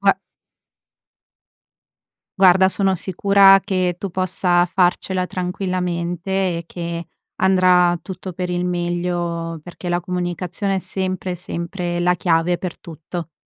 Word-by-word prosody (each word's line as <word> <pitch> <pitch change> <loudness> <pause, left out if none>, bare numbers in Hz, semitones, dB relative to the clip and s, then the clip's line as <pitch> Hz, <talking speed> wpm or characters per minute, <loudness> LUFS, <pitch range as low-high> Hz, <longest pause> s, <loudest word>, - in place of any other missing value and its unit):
Gua - - +5 2.3
Guarda 190 0 +6
sono 190 -1 +1
sicura 195 +2 +5
che 185 -3 0
tu 195 - -4
possa 180 -1 +1
farcela 180 0 +1
tranquillamente 180 -1 -3 0.3
e - - -8
che 170 -1 -5 0.4
andrà 180 -2 +4
tutto 185 -1 -7
per 180 +1 -4
il 175 0 -1
meglio 175 -1 -2
perché 175 +2 -8
la 175 0 +1
comunicazione 180 +2 -2
è 190 - 0
sempre 185 -1 -3
sempre 175 0 -4
la 180 +1 +2
chiave 170 0 +1
per 180 -3 -6
tutto. 165 +1 -8
180 Hz, 115 wpm, -20 LUFS, 175-185 Hz, 2.3 s, Guarda